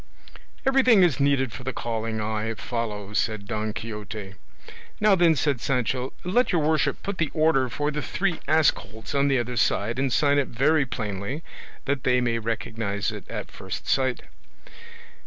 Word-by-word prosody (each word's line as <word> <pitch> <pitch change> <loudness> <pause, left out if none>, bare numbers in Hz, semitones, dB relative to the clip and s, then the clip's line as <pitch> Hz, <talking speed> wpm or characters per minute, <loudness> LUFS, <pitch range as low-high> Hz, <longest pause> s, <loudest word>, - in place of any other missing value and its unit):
"Everything 255 -7 +5
is 165 -6 +3
needed 140 -4 +2
for 130 - -8
the 130 - -2
calling 115 -1 -3
I 110 +1 -2
follow," 105 -4 -4
said 110 -1 0
Don 110 +1 -2
Quixote. 105 -2 -6 0.7
"Now 210 -1 +5
then," 170 -3 +5
said 140 -5 0
Sancho, 130 0 0
"let 220 +8 +2
your 170 -4 +2
worship 150 -2 +1
put 200 -1 -4
the 160 -3 +1
order 155 -5 +3
for 145 +6 -1
the 150 0 -3
three 180 0 -1
ass 155 0 +5
colts 110 +5 -9
on 140 0 +3
the 135 -1 +3
other 120 0 -2
side, 115 +3 +1
and 135 -1 +1
sign 145 +2 +3
it 140 - 0
very 140 +4 +2
plainly, 110 - -4 0.4
that 140 -1 -1
they 125 -1 +3
may 120 -2 0
recognise 110 -2 -2
it - - -9
at - - -5
first - - -7
sight." 130 -2 +1
130 Hz, 170 wpm, -25 LUFS, 110-150 Hz, 0.7 s, Everything